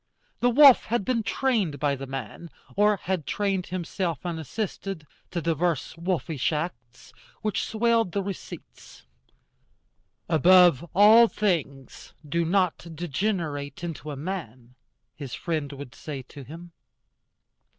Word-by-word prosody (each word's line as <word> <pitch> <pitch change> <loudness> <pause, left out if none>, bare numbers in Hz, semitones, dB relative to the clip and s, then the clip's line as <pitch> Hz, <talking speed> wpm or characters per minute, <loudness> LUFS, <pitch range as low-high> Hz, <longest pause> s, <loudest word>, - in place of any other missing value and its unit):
The 245 - +3
wolf 275 +1 +7
had 230 -3 -1
been 250 -3 +1
trained 220 - 0
by 145 -1 +1
the 135 0 -7
man, 135 +5 -7 0.3
or 210 0 +4
had 180 -4 -3
trained 195 -3 -1
himself 175 -2 -3
unassisted, 175 +1 -4 0.2
to 170 -3 -4
divers 165 -1 0
wolfish 165 -5 -1
arts, 130 -7 -6 0.3
which 215 -1 -1
swelled 230 -3 +1
the 200 +1 -1
receipts. 195 -1 -9 1.2
"Above 175 -2 +6
all 220 +4 +8
things, 155 - -3
do 170 +3 0
not 180 0 0
degenerate 160 -4 -3
into 155 -4 -5
a 145 - -4
man," 135 - -6 0.4
his 140 -5 -7
friend 155 -5 -3
would 140 -2 -9
say 140 -4 -7
to 140 +2 -12
him. 165 +6 -11
170 Hz, 120 wpm, -26 LUFS, 145-195 Hz, 1.2 s, all